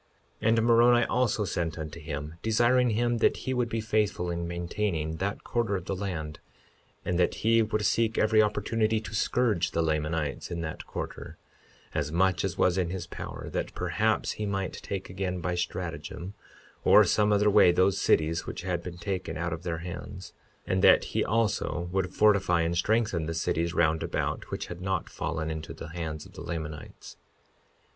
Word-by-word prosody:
52:10 110 Hz, -, 0 dB
And 115 Hz, 0 st, +4 dB
Moroni 120 Hz, 0 st, +5 dB
also 120 Hz, -4 st, +1 dB
sent 85 Hz, -3 st, -2 dB
unto 80 Hz, +1 st, -6 dB
him, 75 Hz, -1 st, -5 dB
desiring 120 Hz, +3 st, +3 dB
him 120 Hz, +2 st, +1 dB
that -, -, +3 dB
he 130 Hz, -, -3 dB
would 125 Hz, -2 st, 0 dB
be 115 Hz, -, -1 dB
faithful 105 Hz, -5 st, 0 dB
in 85 Hz, 0 st, -3 dB
maintaining 85 Hz, -2 st, -2 dB
that 100 Hz, +3 st, -3 dB
quarter 115 Hz, -4 st, 0 dB
of 90 Hz, -2 st, -4 dB
the 95 Hz, -, -2 dB
land, 85 Hz, -6 st, -4 dB, 0.7 s
and 90 Hz, 0 st, 0 dB
that 90 Hz, -, +2 dB
he 115 Hz, 0 st, +5 dB
would 105 Hz, -1 st, 0 dB
seek 115 Hz, +2 st, +2 dB
every 110 Hz, 0 st, +4 dB
opportunity 110 Hz, +1 st, +1 dB
to 110 Hz, 0 st, -9 dB
scourge 105 Hz, -5 st, +1 dB
the 85 Hz, -, 0 dB
Lamanites 75 Hz, -1 st, -1 dB
in 85 Hz, -1 st, -3 dB
that 80 Hz, -1 st, -6 dB
quarter, -, -, -6 dB, 0.6 s
as 75 Hz, -, -1 dB
much 90 Hz, +1 st, +2 dB
as 95 Hz, -1 st, -2 dB
was 90 Hz, +1 st, +3 dB
in 90 Hz, -2 st, 0 dB
his 95 Hz, +1 st, -4 dB
power, -, -, -7 dB
that -, -, -3 dB
perhaps -, -, 0 dB
he 105 Hz, -, -4 dB
might 95 Hz, -2 st, -2 dB
take 95 Hz, -1 st, -5 dB
again 90 Hz, -1 st, -3 dB
by 90 Hz, +1 st, -2 dB
stratagem 90 Hz, +1 st, -4 dB, 0.5 s
or -, -, +7 dB
some 105 Hz, 0 st, +2 dB
other 105 Hz, 0 st, +4 dB
way 90 Hz, -, +7 dB
those 95 Hz, +2 st, +2 dB
cities 80 Hz, +1 st, +2 dB
which -, -, -5 dB
had 90 Hz, -2 st, -1 dB
been 85 Hz, 0 st, -7 dB
taken 90 Hz, -2 st, -3 dB
out 85 Hz, 0 st, -2 dB
of 80 Hz, -, -5 dB
their 85 Hz, -2 st, -3 dB
hands; 90 Hz, +2 st, -7 dB, 0.3 s
and 95 Hz, 0 st, 0 dB
that -, -, +7 dB
he -, -, +2 dB
also 105 Hz, -5 st, 0 dB
would 95 Hz, -1 st, 0 dB
fortify 100 Hz, -5 st, +3 dB
and 85 Hz, +1 st, 0 dB
strengthen 95 Hz, -3 st, +1 dB
the 80 Hz, -, -3 dB
cities 85 Hz, +1 st, -1 dB
round 80 Hz, -1 st, +2 dB
about, -, -, -2 dB
which -, -, -4 dB
had 90 Hz, 0 st, -8 dB
not 95 Hz, -1 st, -2 dB
fallen 80 Hz, -1 st, -3 dB
into 80 Hz, -1 st, -6 dB
the -, -, -8 dB
hands 80 Hz, -2 st, -5 dB
of -, -, -15 dB
the -, -, -9 dB
Lamanites. 80 Hz, -2 st, -7 dB
90 Hz, 185 wpm, -28 LUFS, 85-105 Hz, 0.7 s, or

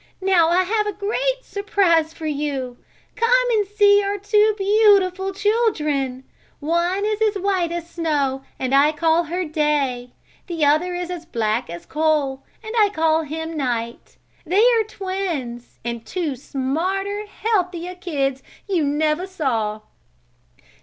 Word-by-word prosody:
Now 375 Hz, -4 st, +3 dB
I 360 Hz, +2 st, +3 dB
have 420 Hz, +3 st, 0 dB
a 415 Hz, -, -2 dB
great -, -, -1 dB
surprise 370 Hz, -6 st, +1 dB
for 320 Hz, -1 st, -9 dB
you. 280 Hz, -4 st, -3 dB, 0.4 s
Come -, -, +3 dB
and 420 Hz, -3 st, +2 dB
see 410 Hz, 0 st, +4 dB
our 400 Hz, 0 st, -2 dB
two 420 Hz, +1 st, +3 dB
beautiful 390 Hz, -2 st, +3 dB
children. 305 Hz, -, 0 dB, 0.4 s
One 345 Hz, +6 st, 0 dB
is 430 Hz, 0 st, -1 dB
as 430 Hz, -1 st, +2 dB
white 375 Hz, -3 st, 0 dB
as 340 Hz, -1 st, -4 dB
snow 295 Hz, -6 st, -1 dB, 0.2 s
and 260 Hz, 0 st, -2 dB
her 275 Hz, -, +7 dB
I 300 Hz, +2 st, +4 dB
call 330 Hz, +2 st, +2 dB, 0.3 s
Day. 280 Hz, -5 st, 0 dB, 0.4 s
The 330 Hz, -5 st, 0 dB
other 320 Hz, +5 st, +2 dB
is 355 Hz, 0 st, -4 dB
as 340 Hz, -2 st, -7 dB
black 225 Hz, -, -1 dB
as 170 Hz, 0 st, -8 dB
a -, -, -35 dB
coal, 300 Hz, -4 st, 0 dB, 0.2 s
and 440 Hz, 0 st, -6 dB
him 460 Hz, -, +3 dB
I 415 Hz, -, +5 dB
call 320 Hz, -3 st, +1 dB, 0.2 s
Night. 245 Hz, -7 st, -4 dB, 0.3 s
They 380 Hz, +7 st, +3 dB
are 455 Hz, -1 st, +3 dB
twins, 365 Hz, -, -5 dB
and 235 Hz, -1 st, -4 dB
two 325 Hz, -4 st, -3 dB
smarter, 370 Hz, -, -2 dB
healthier 365 Hz, -5 st, -2 dB
kids 280 Hz, -7 st, -2 dB, 0.3 s
you 365 Hz, -6 st, +1 dB
never 305 Hz, +5 st, 0 dB
saw. 230 Hz, -, -2 dB
340 Hz, 145 wpm, -21 LUFS, 285-400 Hz, 0.4 s, her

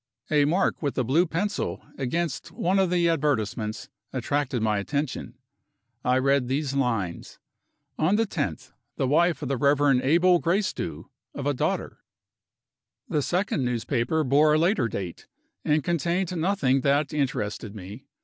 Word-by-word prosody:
A 150 Hz, -2 st, +4 dB
mark 175 Hz, +6 st, +1 dB
with 145 Hz, -3 st, -2 dB
a 130 Hz, -, +2 dB
blue 155 Hz, +9 st, +2 dB
pencil, 200 Hz, +6 st, -2 dB
against 145 Hz, +3 st, -2 dB
one 190 Hz, +3 st, +1 dB
of 190 Hz, -2 st, +3 dB
the 175 Hz, -1 st, +2 dB
advertisements, 115 Hz, -9 st, -1 dB, 0.2 s
attracted 130 Hz, 0 st, -1 dB
my 105 Hz, -2 st, +1 dB
attention. 140 Hz, +7 st, -3 dB, 0.7 s
I 125 Hz, +1 st, +3 dB
read 135 Hz, -1 st, +2 dB
these 135 Hz, +1 st, -1 dB
lines: 115 Hz, -11 st, -2 dB, 0.6 s
"On 165 Hz, +6 st, +3 dB
the 225 Hz, +1 st, +2 dB
10th 210 Hz, -, -1 dB
inst., -, -, -15 dB, 0.2 s
the 135 Hz, -, +1 dB
wife 160 Hz, +2 st, +2 dB
of -, -, -2 dB
the 135 Hz, 0 st, -1 dB
Rev. 140 Hz, -1 st, +3 dB
Abel 175 Hz, +5 st, +4 dB
Gracedieu, 175 Hz, -1 st, -1 dB, 0.3 s
of 140 Hz, -, -5 dB
a 145 Hz, -, +2 dB
daughter." 125 Hz, -, -2 dB, 1.1 s
The 150 Hz, -, +1 dB
second 175 Hz, -2 st, 0 dB
newspaper 125 Hz, +5 st, 0 dB
bore 150 Hz, +3 st, +4 dB
a -, -, +4 dB
later 165 Hz, -, +2 dB
date, 95 Hz, -5 st, -6 dB, 0.4 s
and 150 Hz, -1 st, +2 dB
contained 175 Hz, +3 st, 0 dB
nothing 160 Hz, -7 st, +1 dB
that 145 Hz, +3 st, +1 dB
interested 110 Hz, -7 st, -2 dB
me. 105 Hz, +6 st, -10 dB
145 Hz, 150 wpm, -26 LUFS, 125-170 Hz, 1.1 s, A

